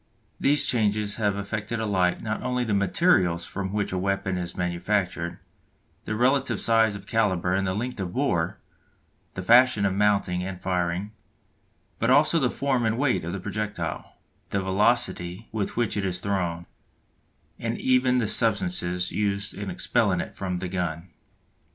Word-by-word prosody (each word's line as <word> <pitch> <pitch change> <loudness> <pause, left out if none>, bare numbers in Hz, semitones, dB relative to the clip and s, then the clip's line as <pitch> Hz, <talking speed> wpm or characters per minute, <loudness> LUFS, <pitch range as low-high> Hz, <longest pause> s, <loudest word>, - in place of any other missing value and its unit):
These 145 +1 +3
changes 105 -3 +1
have 105 -3 +1
affected 105 +3 -4
alike 95 -5 0
not 110 0 -3
only 125 -1 -1
the 110 -3 -1
materials 95 - +2
from 95 -1 -4
which 105 0 -1
a 95 - -1
weapon 95 0 -1
is 90 -1 -5
manufactured, 90 0 -1 0.7
the 110 - -2
relative 130 +4 +2
size 115 -2 +3
of 100 -1 -9
calibre 95 -5 +1
and 95 0 0
length 120 +1 -4
of 90 -2 -3
bore, 100 -8 0 0.8
the 95 - -4
fashion 120 -1 +5
of 95 - +1
mounting 100 -3 +1
and 95 -1 -5
firing, 90 +2 -1 0.9
but 115 - +1
also 150 +5 +5
the 130 -4 +2
form 130 -2 0
and 110 0 +1
weight 135 - +1
of 85 - -4
the 95 - -4
projectile, 105 -3 -4 0.3
the 100 -1 -1
velocity 95 -1 +1
with 110 -1 -3
which 120 -2 +1
it 105 - -1
is 90 -2 -1
thrown, 90 -3 -2 0.9
and - - -2
even 125 0 +2
the 115 -4 +1
substances 90 -5 +1
used 100 -1 -1
in - - -5
expelling - - +1
it - - -5
from 90 -2 -3
the 90 +1 -4
gun. 90 -1 -4
100 Hz, 155 wpm, -25 LUFS, 90-115 Hz, 0.9 s, fashion